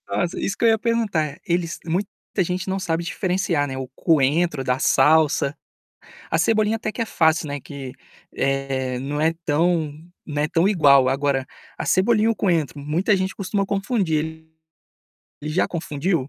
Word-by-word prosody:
Nossa, 175 - -2
isso 195 - -2
que - - +1
eu - - +7
ia 220 -1 +3
perguntar, 200 -10 -1
eles 170 -1 -1
muita 180 +5 -1 0.4
gente 180 +2 -3
não 190 +1 -1
sabe 170 -2 -1
diferenciar, 180 -4 -1
né, 130 -1 -5
o 130 -1 -5
coentro 155 -1 +2
da 125 0 0
salsa. 150 0 +3 0.7
A - - +1
cebolinha 215 0 +2
até 215 -1 -3
que 235 - -5
é - - 0
fácil, 160 -5 +2
né, 145 0 -4
que, 135 -2 -8 0.4
eh, 135 -2 -1
não 145 +3 -3
é 160 +2 +2
tão 160 0 +1 0.3
não 145 -2 -2
é 150 - +1
tão 165 +4 +2
igual. 140 -9 +5
Agora, 135 0 0 0.3
a - - -4
cebolinha 215 +3 +3
e - - +3
o 230 - +1
coentro 165 -9 0
muita 165 +9 +1
gente 190 0 -2
costuma 195 0 -1
confundir 195 -4 0
ele. 160 0 -11 0.9
Já 155 +4 0
confundiu? 160 -2 -2
160 Hz, 170 wpm, -22 LUFS, 145-190 Hz, 0.9 s, eu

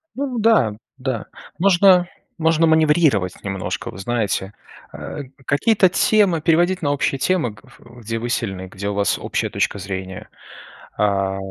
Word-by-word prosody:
Ну 260 -3 -3
да, 210 - +3 0.2
да, 130 -4 -3 0.3
можно 185 -1 +5 0.3
можно 160 0 +3
маневрировать 150 - +3
немножко, 95 -1 -4
вы - - -12
знаете. 105 -2 -2 0.4
Э, 145 - -7 0.2
какие-то 190 +7 +3
темы 190 -3 +2
переводить 175 +3 +2
на 145 -3 0
общие 140 -1 0
темы, 140 - 0
э, - - -22
в 120 +1 -16
где 115 +1 -4
вы 120 +1 -4
сильны, 95 -6 -3
где 100 +2 -5
у - - -2
вас 100 -1 +1
общая - - -2
точка - - -1
зрения, 95 -1 -6 0.7
а. 95 -2 0
130 Hz, 145 wpm, -20 LUFS, -, 0.7 s, можно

